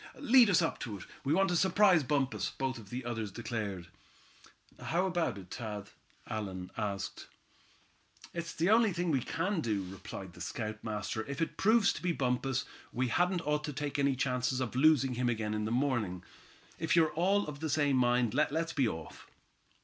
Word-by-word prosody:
"Lead 250 -4 +6
us 180 -3 +4 0.2
to 105 -4 -5
it. 90 - -10 0.2
We 140 - -1
want 195 +1 +3
to 175 - +1
surprise 190 -1 +5
Bumpus," 130 -7 0
both 130 -6 -4
the 125 0 -5
others 115 -4 -3
declared. 105 -6 -4 0.9
"How 175 +3 0
about 175 - 0
it, 95 -2 -9
Thad?" 105 -3 -6 0.4
Allan 95 -4 -5
asked. 100 -2 -4 1.1
"It's 170 -1 -5
the 170 +5 +2
only 225 -3 +5
thing 175 0 0
we 135 -4 +2
can 175 - -1
do," 105 -7 -1
replied 95 -1 -8
the - - -12
scoutmaster. 110 -1 -3
"If 140 0 -5
it 165 - -1
proves 220 0 +4
to - - -7
be 180 -1 0
Bumpus, 130 -1 0 0.3
we 125 +1 0
hadn't 175 +5 +1
ought 150 0 0
to 150 - -4
take 145 0 -3
any 140 -1 +3
chances 125 0 0
of 125 -2 -3
losing 135 -2 +4
him 125 0 0
again 110 -2 -1
in 105 0 -1
the 110 - -2
morning. 120 -9 0 0.6
If 160 +1 +1
you're 160 -2 +4
all 195 +5 +2
of 150 -1 -7
the 160 +1 -2
same 145 -2 +2
mind, 120 -2 +2
let's 160 +3 +1
be 135 -4 +2
off." 80 -6 -7
130 Hz, 180 wpm, -32 LUFS, 110-165 Hz, 1.1 s, Lead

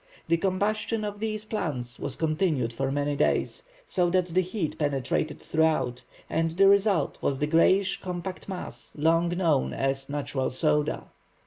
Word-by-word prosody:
The 170 - +4
combustion 210 +4 0
of 205 0 -5
these 215 -1 -3
plants 135 - -3
was 135 - -1
continued 155 -5 0
for 135 +3 -1
many 145 +1 0
days, 145 - 0 0.2
so 180 - +1
that 185 0 +2
the 185 - +4
heat 185 -3 -3
penetrated 145 +1 -1
throughout, 155 -6 +1 0.3
and 165 +1 0
the 195 0 +6
result 200 -4 +3
was 135 - 0
the 150 - 0
greyish 185 +5 +3
compact 180 +1 -5
mass, 185 -2 -6
long 165 +3 +3
known 170 -6 +1
as 135 0 -1
"natural 140 -2 -2
soda." 150 +2 +1
160 Hz, 150 wpm, -27 LUFS, 145-190 Hz, 0.3 s, the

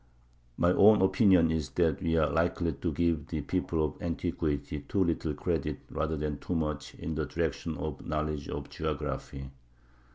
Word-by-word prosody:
My 85 - +4
own 105 +3 +7
opinion 95 -5 +5
is 80 -4 -1
that - - +2
we 80 0 +1
are 80 -2 +4
likely 85 0 +1
to 75 +5 -2
give 80 -1 0
the 80 -2 -3
people 80 0 0
of 75 - -6
antiquity 80 -4 -2
too 95 +7 0
little 80 -3 -1
credit - - -2
rather 80 0 -1
than 75 -1 -3
too 90 - -3
much 75 -4 -2
in 80 - -4
the 75 -1 -2
direction 80 +3 -2
of 75 -1 -4
a - - -11
knowledge 75 -1 -2
of - - -4
geography. 75 -3 -4
80 Hz, 170 wpm, -30 LUFS, 75-85 Hz, -, own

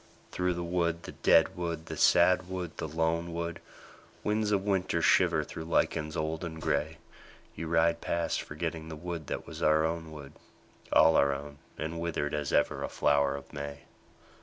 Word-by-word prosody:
Through 90 -1 0
the 85 - -3
wood, 85 -1 -1
the - - -7
dead 90 +4 +4
wood, 85 -2 -4
the - - -6
sad 90 +1 +4
wood, 90 -3 -5
the - - -3
lone 80 +2 -1
wood, 85 0 -4 0.6
Winds 105 0 0
of 100 -2 +2
winter 95 -3 0
shiver - - +4
through 80 - -7
lichens 75 -1 0
old 80 +1 -2
and 80 -2 -5
grey, 80 +1 -1 0.6
You 80 - -5
ride 85 0 +2
past 85 -1 -1
forgetting 80 +1 -5
the 80 - -6
wood 85 -1 -6
that - - -4
was - - -9
our 80 +1 +4
own 80 0 -3
wood, 70 -2 -10 0.6
All 80 - +6
our 70 0 +3
own 70 +1 -9 0.2
and 80 +2 -4
withered 85 -3 -2
as 75 -2 -2
ever - - +2
a - - -3
flower 70 -1 +2
of 70 - -10
May. 70 0 -6
80 Hz, 180 wpm, -30 LUFS, 75-85 Hz, 0.6 s, All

